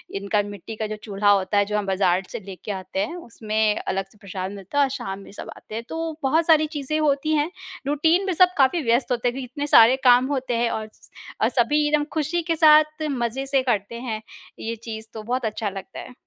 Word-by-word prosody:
इनका 200 +1 0
मिट्टी 205 +2 -8
का 215 0 -3
जो 215 - -4
चूल्हा 205 -1 0
होता 200 +1 +2
है 205 - +4
जो 210 +1 -2
हम 210 - -1
बाज़ार 190 -1 +1
से - - -5
लेके 195 +1 -8
आते 190 0 -5
हैं, 210 - -2
उसमें 220 -8 -1
अलग 195 0 -1
से 210 - -22
प्रसाद 195 -2 -6
मिलता 200 +6 -7
है 285 - +6
और 275 - +1
शाम 240 -8 -5
में 195 - -13
सब - - -9
आते 215 - -11
हैं। 230 - -4
तो 325 -1 -4
बहुत 320 +5 +2
सारी 310 -2 +5
चीज़ें 300 +2 -2
होती 300 +1 +1
हैं, 300 +3 0 0.4
रूटीन 320 +6 +2
भी 380 - 0
सब 365 +2 +5
काफ़ी 280 +4 +3
व्यस्त 240 +2 +1
होते 245 0 0
हैं 245 - 0
क्योंकि 265 0 -5
इतने 290 +1 -3
सारे 230 -1 +7
काम 250 0 +6
होते 260 -2 -2
हैं 235 0 +1
और 220 0 -3
स - - -21 0.3
अ, - - +4
सभी 295 +5 +2
एकदम 295 0 +2
खुशी 320 +2 0
के 330 - +2
साथ 305 0 +5
मज़े 245 +1 -2
से 270 -1 +2
करते 225 -3 -1
हैं 225 -4 -4 0.4
ये 230 +1 -4
चीज़, 220 -1 -8
तो 220 -1 -7
बहुत 245 +2 -2
अच्छा 215 -1 -2
लगता 195 -1 -8
है। - - -10
235 Hz, 235 wpm, -23 LUFS, 210-295 Hz, 0.4 s, सारे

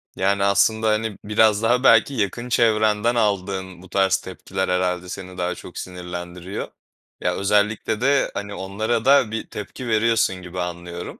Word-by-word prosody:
Yani, 100 +1 +1
aslında, 105 +3 +3
hani, 110 -1 -1
biraz 105 0 +3
daha 120 +3 +2
belki 115 +2 +5
yakın 120 +1 -2
çevrenden 110 -1 +2
aldığın 95 -4 -1
bu 95 - -14
tarz 95 0 +2
tepkiler 95 0 -4
herhâlde 90 0 0
seni 90 0 -8
daha 90 0 -1
çok - - -11
sinirlendiriyor. 90 +1 -6 0.5
Ya, - - 0
özellikle 105 +2 +1
de, 140 +2 +2
hani, 100 0 -5
onlara 110 +4 -2
da 135 -5 +5
bir 110 - -4
tepki 120 +4 -7
veriyorsun 115 -3 +2
gibi 90 0 -8
anlıyorum. 85 0 -6
100 Hz, 150 wpm, -22 LUFS, 90-110 Hz, 0.5 s, belki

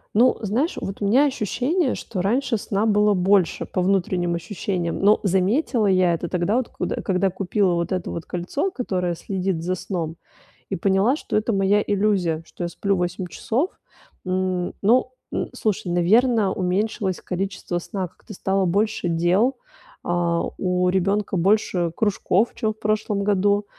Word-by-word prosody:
Ну, 245 +4 +5
знаешь, 235 - 0
вот 195 +2 -6
у - - 0
меня 265 +8 +5
ощущение, 265 - 0
что 185 -5 -4
раньше 235 +4 +1
сна 200 +1 -1
было 210 -1 +3
больше 185 0 +2
по 185 - -2
внутренним 180 -2 +1
ощущениям. 175 -1 -3
Но 205 +2 +5
заметила 205 - +2
я 185 -2 +3
это 170 +1 -3
тогда, 185 +6 +1
вот 255 - -1
куд - - -3
когда 190 -1 +1
купила 190 0 +1
вот 170 +1 -1
это 185 -2 -2
вот 170 - -5
кольцо, 180 - -2
которое 180 - -2
следит 185 -2 -2
за 180 +1 0
сном, 170 -3 -4 0.5
и - - -1
поняла, 195 - +2
что - - -5
это 215 +2 +1
моя 200 +1 +2
иллюзия, 195 -6 +1
что 175 - -8
я - - -1
сплю 200 +3 -1
8 180 +1 -2
часов. 265 - -1 0.5
М, 185 -1 -1
ну, 255 +4 +3 0.2
н - - -2
слушай, 210 -4 -1
наверно, 210 +4 +3
уменьшилось 190 +1 -1
количество 180 -1 -3
сна, 185 +1 -4
как-то 210 +5 -14
стало 190 0 0
больше 200 0 0
дел. 180 +10 +2 0.5
А, 170 -1 0 0.2
у 180 -1 +1
ребёнка 195 +1 0
больше 180 -2 +2
кружков, 205 0 +1
чем 215 -1 -1
в 220 - -34
прошлом 210 -1 0
году, 205 0 +2
195 Hz, 160 wpm, -23 LUFS, 180-215 Hz, 0.5 s, Ну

